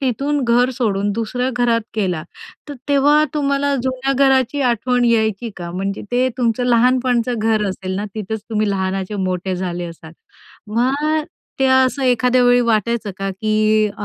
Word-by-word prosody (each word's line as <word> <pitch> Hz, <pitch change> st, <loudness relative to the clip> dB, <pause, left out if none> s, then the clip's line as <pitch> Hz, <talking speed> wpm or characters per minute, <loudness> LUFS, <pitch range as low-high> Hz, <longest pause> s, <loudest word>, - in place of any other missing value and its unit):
तिथून 275 Hz, +3 st, -1 dB
घर 245 Hz, +2 st, +3 dB
सोडून 205 Hz, -5 st, -1 dB
दुसऱ्या 240 Hz, +4 st, -2 dB
घरात 235 Hz, -1 st, +2 dB, 0.2 s
गेला, 180 Hz, -6 st, -1 dB, 0.5 s
तर 290 Hz, -, -6 dB
तेव्हा 290 Hz, +2 st, +4 dB
तुम्हाला 280 Hz, -1 st, 0 dB
जुन्या 260 Hz, +1 st, -1 dB
घराची 270 Hz, 0 st, +2 dB
आठवण 245 Hz, +2 st, 0 dB
यायची 225 Hz, -1 st, +1 dB
का? 170 Hz, -1 st, -6 dB
म्हणजे 195 Hz, +2 st, -4 dB
ते 255 Hz, +1 st, +2 dB
तुमचं 240 Hz, 0 st, 0 dB
लहानपणाचं 245 Hz, 0 st, +2 dB
घर 220 Hz, -1 st, +1 dB
असेल 185 Hz, 0 st, -4 dB
ना, 205 Hz, -, -3 dB
तिथंच 220 Hz, 0 st, -4 dB
तुम्ही 215 Hz, -1 st, 0 dB
लहानाचे 190 Hz, +1 st, -2 dB, 0.2 s
मोठे 185 Hz, 0 st, -3 dB
झाले 175 Hz, -1 st, -3 dB
असाल. 165 Hz, -1 st, -11 dB, 0.6 s
मग 290 Hz, +6 st, +1 dB, 0.4 s
ते 270 Hz, -, +3 dB
असं 260 Hz, +1 st, +3 dB
एखाद्या 250 Hz, 0 st, +3 dB
वेळी 245 Hz, 0 st, +5 dB
वाटायचं 230 Hz, -1 st, 0 dB
का, 195 Hz, 0 st, -2 dB
की 215 Hz, +2 st, +1 dB
अ, 205 Hz, -, -5 dB
235 Hz, 155 wpm, -19 LUFS, 205-260 Hz, 0.6 s, वेळी